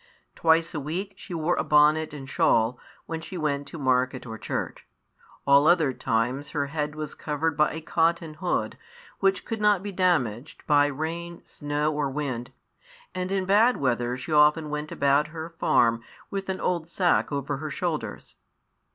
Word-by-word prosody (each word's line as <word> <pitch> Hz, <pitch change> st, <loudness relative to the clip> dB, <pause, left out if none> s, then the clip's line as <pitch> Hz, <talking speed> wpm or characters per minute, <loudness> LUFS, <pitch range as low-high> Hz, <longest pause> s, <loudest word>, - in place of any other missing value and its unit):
Twice 165 Hz, 0 st, +2 dB
a 155 Hz, -, -2 dB
week 180 Hz, +8 st, -4 dB
she 180 Hz, -, -8 dB
wore 165 Hz, +2 st, +1 dB
a -, -, +1 dB
bonnet 150 Hz, +1 st, +4 dB
and 140 Hz, -3 st, -8 dB
shawl, 120 Hz, -2 st, +2 dB, 0.3 s
when 165 Hz, -1 st, -5 dB
she 180 Hz, +3 st, -7 dB
went 145 Hz, -3 st, -1 dB
to 165 Hz, -, -8 dB
market 130 Hz, -2 st, 0 dB
or 110 Hz, -2 st, -7 dB
church. -, -, -4 dB, 0.6 s
All 140 Hz, +2 st, +5 dB
other 165 Hz, -6 st, +4 dB
times 125 Hz, +6 st, -1 dB
her 145 Hz, -, +1 dB
head 150 Hz, -1 st, -2 dB
was 155 Hz, -1 st, -5 dB
covered 155 Hz, +1 st, -2 dB
by 150 Hz, 0 st, +3 dB
a 160 Hz, -, -5 dB
cotton 165 Hz, 0 st, 0 dB
hood, 175 Hz, +4 st, -2 dB, 0.4 s
which 195 Hz, -1 st, +1 dB
could 225 Hz, -2 st, -4 dB
not 205 Hz, -3 st, +3 dB
be 205 Hz, -, -4 dB
damaged 155 Hz, -, 0 dB
by 145 Hz, -1 st, +4 dB
rain, 165 Hz, +4 st, -5 dB
snow, 145 Hz, +1 st, -2 dB
or 145 Hz, -2 st, -1 dB
wind; 130 Hz, -4 st, -4 dB, 0.6 s
and 185 Hz, 0 st, -3 dB
in 195 Hz, -1 st, 0 dB
bad 215 Hz, +6 st, +4 dB
weather 125 Hz, -2 st, 0 dB
she 130 Hz, -, -7 dB
often 150 Hz, +1 st, +4 dB
went 150 Hz, 0 st, -4 dB
about 140 Hz, +2 st, +2 dB
her 160 Hz, +1 st, -7 dB
farm 115 Hz, -1 st, +3 dB, 0.3 s
with 195 Hz, -1 st, -4 dB
an 190 Hz, -, -2 dB
old 170 Hz, -3 st, -1 dB
sack 175 Hz, -1 st, +1 dB
over 140 Hz, 0 st, -2 dB
her 155 Hz, +2 st, -5 dB
shoulders. 155 Hz, -, -4 dB
150 Hz, 170 wpm, -26 LUFS, 140-170 Hz, 0.6 s, All